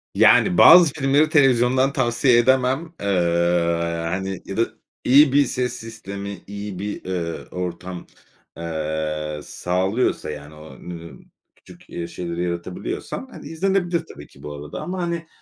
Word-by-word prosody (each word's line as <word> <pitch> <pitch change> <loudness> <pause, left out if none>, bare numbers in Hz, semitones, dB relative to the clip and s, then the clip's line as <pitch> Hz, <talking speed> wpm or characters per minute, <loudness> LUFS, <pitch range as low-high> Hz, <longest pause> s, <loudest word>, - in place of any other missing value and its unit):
Yani, 90 - +5
bazı 170 -4 +8
filmleri 145 +1 +2
televizyondan 130 -2 +3
tavsiye 120 0 +3
edemem, 130 +6 +2
ııı, 85 -3 +1
hani, 95 +1 -3
ya 95 - -6
da - - +3 0.4
iyi 140 +2 +6
bir 145 0 +5
ses 125 -1 -2
sistemi, 100 -4 -7
iyi 100 -2 -6
bir, 105 -1 -5
ııı, 85 -3 -4
ortam, 90 0 -6 0.5
ııı, 80 -2 -3
sağlıyorsa, 95 0 -1
yani, 75 0 -9
o 75 -3 -13
n 85 -1 -9 0.4
küçük, - - -18
eee, 85 -1 -5
şeyleri 85 0 -4
yaratabiliyorsan, 90 - -5
hani, - - -10
izlenebilir 175 0 0
tabii 75 0 -12
ki 70 - -19
bu 75 - -6
arada 75 0 -7
ama, 185 +1 -4
hani, 170 -1 -3
95 Hz, 135 wpm, -22 LUFS, 85-130 Hz, 0.5 s, bazı